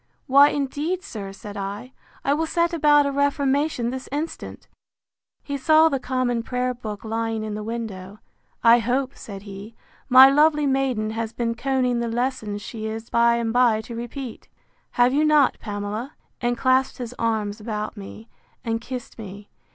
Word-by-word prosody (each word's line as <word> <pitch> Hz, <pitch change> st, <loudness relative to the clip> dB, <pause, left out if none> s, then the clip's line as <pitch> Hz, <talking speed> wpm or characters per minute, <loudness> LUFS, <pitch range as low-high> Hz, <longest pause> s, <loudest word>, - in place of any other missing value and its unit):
Why, 280 Hz, +2 st, +7 dB
indeed, 295 Hz, +6 st, -2 dB
sir, 200 Hz, -, -7 dB
said 205 Hz, +1 st, -10 dB
I, 205 Hz, +6 st, -6 dB, 0.3 s
I 280 Hz, -, +3 dB
will 320 Hz, +2 st, 0 dB
set 340 Hz, +1 st, +1 dB
about 295 Hz, -2 st, +4 dB
a 280 Hz, -, 0 dB
reformation 280 Hz, -2 st, 0 dB
this 260 Hz, 0 st, -6 dB
instant. 300 Hz, +4 st, -5 dB, 0.8 s
He 285 Hz, -1 st, -4 dB
saw 315 Hz, +4 st, +5 dB
the 275 Hz, -3 st, -1 dB
common 250 Hz, -2 st, -1 dB
prayer 250 Hz, +1 st, -2 dB
book 215 Hz, -3 st, -7 dB
lying 225 Hz, 0 st, -2 dB
in 215 Hz, -1 st, -4 dB
the 210 Hz, -, -4 dB
window. 210 Hz, -3 st, -6 dB, 0.5 s
I 235 Hz, +1 st, +7 dB
hope, 255 Hz, +4 st, -1 dB
said 200 Hz, -2 st, -9 dB
he, 200 Hz, +2 st, -10 dB, 0.3 s
my 260 Hz, +1 st, +10 dB
lovely 300 Hz, +1 st, +4 dB
maiden 265 Hz, -6 st, 0 dB
has 225 Hz, 0 st, -4 dB
been 235 Hz, -1 st, -1 dB
conning 250 Hz, 0 st, 0 dB
the 235 Hz, -, -1 dB
lesson 230 Hz, -3 st, -2 dB
she 220 Hz, +1 st, -6 dB
is 225 Hz, +1 st, -6 dB
by 235 Hz, 0 st, +4 dB
and 230 Hz, -1 st, -1 dB
by 245 Hz, -3 st, +4 dB
to 230 Hz, +1 st, -9 dB
repeat. 240 Hz, +1 st, -7 dB, 0.5 s
Have 245 Hz, +1 st, +3 dB
you 295 Hz, +2 st, +3 dB
not, 300 Hz, -3 st, +4 dB
Pamela? 210 Hz, +5 st, -5 dB, 0.3 s
and 240 Hz, -1 st, 0 dB
clasped 260 Hz, +1 st, +2 dB
his 245 Hz, -1 st, -6 dB
arms 220 Hz, -2 st, -1 dB
about 215 Hz, 0 st, -4 dB
me, 210 Hz, +2 st, -10 dB, 0.4 s
and 225 Hz, 0 st, -1 dB
kissed 250 Hz, -1 st, -7 dB
me. 205 Hz, -1 st, -10 dB
240 Hz, 165 wpm, -23 LUFS, 220-270 Hz, 0.8 s, my